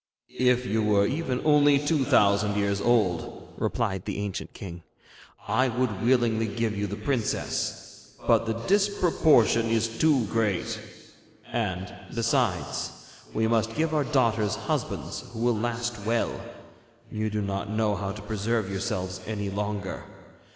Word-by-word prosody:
'If 125 0 +3
you 110 -1 0
were 105 -2 +3
even 130 0 -1
only 145 -1 +6
two 145 0 +1
thousand 105 -1 +3
years 100 0 0
old,' 100 -8 0
replied 95 -6 -1
the - - -3
ancient 100 -2 -4
king, 85 -3 -8 0.7
'I 130 +1 +3
would 120 -5 -1
willingly 115 -2 +2
give 110 0 -1
you 100 +1 -1
the 100 - -4
princess, 115 +1 -3
but 115 - +3
the 110 - 0
disproportion 170 - +3
is 115 0 +2
too 145 -7 +4
great; 105 -4 -1 0.7
and, 95 -4 -2 0.2
besides, 115 - 0 0.4
we 110 0 +1
must 115 0 +1
give 160 +1 0
our 150 -2 +2
daughters 115 -7 +2
husbands - - -3
who 110 - -6
will 120 -1 +3
last 120 0 -2
well. 115 +2 +1 0.8
You 110 0 -1
do 105 0 -2
not 100 +1 -3
know 110 -1 +1
how 100 0 -3
to 105 0 -8
preserve 110 -1 -1
yourselves 95 -1 -3
any 100 -2 -3
longer. 100 -1 -3
110 Hz, 140 wpm, -27 LUFS, 100-120 Hz, 0.8 s, only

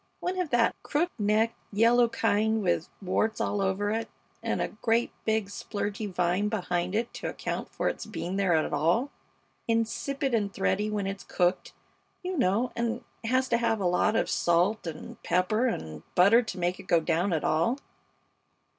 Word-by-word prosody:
One 370 +1 -2
of 350 - -3
that 240 -2 +3
crook 340 +4 0
necked, 215 +2 +2 0.2
yellow 230 +3 +4
kind 220 -1 +1
with 175 -2 0
warts 215 +4 0
all 205 - 0
over 195 +2 0
it, 225 +1 -2 0.3
and - - -1
a - - -1
great, 225 +2 0
big, 220 -1 +1
splurgy 205 +1 -4
vine 180 +3 +1
behind 180 -3 -1
it 230 +2 -1
to - - -5
account - - -4
for - - -2
its - - -3
being 180 +2 -4
there 195 -4 +2
at 155 - 0
all. 180 - +2 0.6
Insipid 240 +4 0
and 205 -3 +1
thready 200 +2 0
when 210 -2 -1
it's 195 0 -4
cooked, 180 0 0 0.5
you 365 +1 -2
know, 245 - +1
and 235 +1 -2 0.2
has 255 +3 +2
to 235 - +3
have 230 -2 +1
a 195 - -1
lot 180 +5 +2
of - - +2
salt 175 +4 +1
and 160 - -8
pepper 215 +7 +1
and 80 - -4
butter 200 +7 +6
to 220 -5 -6
make 175 +1 -1
it - - -11
go 170 - +4
down 170 +4 0
at 160 -3 0
all. 165 - +2
210 Hz, 175 wpm, -28 LUFS, 185-230 Hz, 0.6 s, butter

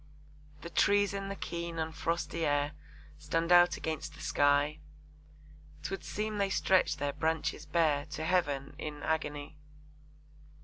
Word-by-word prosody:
The 170 - -7
trees 205 +3 +3
in 195 0 -4
the 200 - -4
keen 170 -2 -5
and 160 0 -2
frosty 165 0 -2
air 145 -1 +1 0.5
Stand 165 +3 -1
out 175 -1 +7
against 155 -1 -4
the - - -14
sky, 145 +1 +2 1.0
'Twould 195 - -4
seem 215 0 -3
they 200 -1 +2
stretch 190 -1 +3
their 140 0 -1
branches 160 -1 -1
bare 150 -3 +2
To 155 - -5
Heaven 145 -6 0
in 150 -1 -6
agony. 150 -1 -2
160 Hz, 135 wpm, -32 LUFS, 150-175 Hz, 1.0 s, out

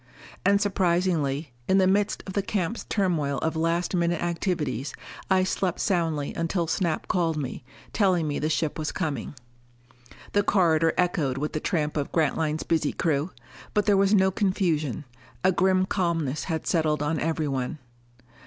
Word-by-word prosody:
And 200 0 +4
surprisingly, 170 -7 0 0.2
in 190 - +4
the 190 - +5
midst 205 +2 +1
of 190 - -6
the 200 - +1
camp's 200 +2 -2
turmoil 165 -9 0
of 160 +1 0
last 165 +3 0
minute 170 -1 +1
activities, 165 - -2 0.3
I 190 -1 +4
slept 185 -1 -1
soundly 165 -7 0
until 165 +1 -1
Snap 170 0 -1
called 165 -3 +1
me, 135 -3 -4 0.3
telling 185 -6 +2
me 145 - -2
the 155 - 0
ship 160 0 -1
was 155 - -2
coming. 150 -6 -3 1.0
The 205 - +3
corridor 165 -5 +3
echoed 160 -7 +1
with 150 +2 -3
the 155 - -1
tramp 155 -3 -1
of 145 - -2
Grantline's 155 0 0
busy 160 -3 0
crew. 155 0 0 0.5
But 210 - +3
there 205 - +4
was 195 +1 +4
no 190 -1 +4
confusion; 170 - 0 0.4
a 185 - +5
grim 185 +1 +3
calmness 165 -7 -1
had 160 -3 -3
settled 155 -3 +1
on 155 +1 0
everyone. 150 -3 -1
165 Hz, 155 wpm, -26 LUFS, 150-190 Hz, 1.0 s, the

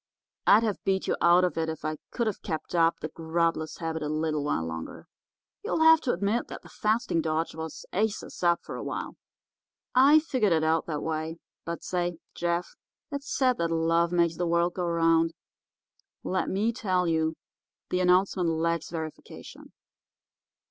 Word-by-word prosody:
I'd 215 +3 +7
have 215 -3 -2
beat 190 -1 0
you - - +1
out 175 +1 +6
if 160 -1 -3
I 155 0 -2
could 235 - -1
have 215 -3 -2
kept 160 +1 -5
up 165 -1 +2
the 155 - -4
grubless 165 0 -1
habit 160 -1 -3
a 150 - -2
little 155 -1 -1
while 80 - -1
longer. 80 0 -7 0.6
You'll 320 - +1
have 320 0 +7
to 255 - 0
admit 200 +6 0
that - - -9
the - - -14
fasting 215 -6 0
dodge 160 +1 -1
was 160 0 -7
aces 215 +2 -2
up 170 -1 +2
for - - -7
a - - -5
while. - - -5 0.8
I 275 +4 +7
figured 255 - +2
it 160 -1 +2
out 160 0 +1
that 150 -3 -3
way. 160 +1 -3 0.3
But 170 0 -5
say, 175 -2 -2 0.2
Jeff, 170 0 -2 0.4
it's 280 0 -5
said 255 -2 +2
that 170 0 +1
love 165 +1 +2
makes 170 -2 +2
the 175 - -1
world 170 +1 +2
go 180 - -2
around. 165 -1 +2 0.9
Let 185 - -1
me 215 +5 0
tell 185 -6 0
you, 160 -1 +1 0.6
the 180 - +1
announcement 180 -1 +3
lacks 165 0 -1
verification. 160 -2 -8
170 Hz, 170 wpm, -27 LUFS, 160-190 Hz, 0.9 s, I'd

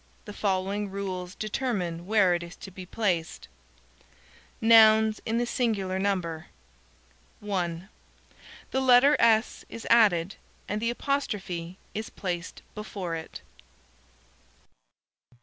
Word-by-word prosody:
The 210 - -8
following 200 +1 -1
rules 190 -2 -5
determine 195 -7 -3
where 205 -4 +4
it 175 - -1
is 170 +2 -9
to 190 - -11
be 185 0 -10
placed: 180 -6 -2 1.1
_Nouns 220 -1 +6
in 225 +1 0
the 240 - +1
singular 200 -7 -1
number 175 -5 -2 1.0
_ - - -12
(1) 175 -3 -2 0.8
The 265 - 0
letter 260 +3 +6
"s" 225 -1 +3
is 230 - -8
added, 200 -6 +4 0.3
and 210 +1 -2
the 230 - 0
apostrophe 195 -10 -3 0.2
is 215 +1 -4
placed 175 -3 -5
before 200 -5 -5
it. 160 -1 -8
200 Hz, 115 wpm, -27 LUFS, 180-220 Hz, 1.1 s, Nouns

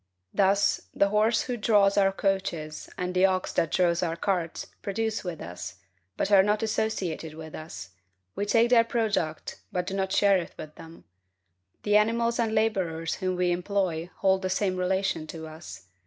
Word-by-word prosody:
Thus, 200 0 +2
the 200 - +3
horse 215 +2 +3
who 250 -1 -3
draws 205 -3 +3
our 195 -1 +4
coaches, 190 -6 -2
and 180 0 -2
the 185 +1 +5
ox 185 -1 -2
who 165 - +2
draws 170 +1 +2
our 165 -2 -1
carts 170 -2 -2 0.2
produce 220 +2 -2
with 175 -4 -5
us, 90 +1 -7 0.4
but 200 - -1
are 195 -1 +8
not 210 +3 +1
associated 195 -8 -2
with 160 0 -9
us; 90 - -8 0.4
we 205 - -2
take 230 +3 +3
their 235 -2 +7
product, 215 -9 -2
but 180 -1 -1
do 190 - -4
not 190 -1 -1
share 200 0 +4
it 170 - -8
with 155 0 -8
them. 165 +1 -13 0.8
The 210 0 +4
animals 230 +2 +1
and 225 -1 +1
laborers 185 -7 0
whom 185 -1 -1
we 180 0 +1
employ 175 -2 -1
hold 190 -1 +2
the 185 - -2
same 190 0 0
relation 185 -3 -1
to 160 0 -7
us. 155 - -10
190 Hz, 175 wpm, -27 LUFS, 165-210 Hz, 0.8 s, are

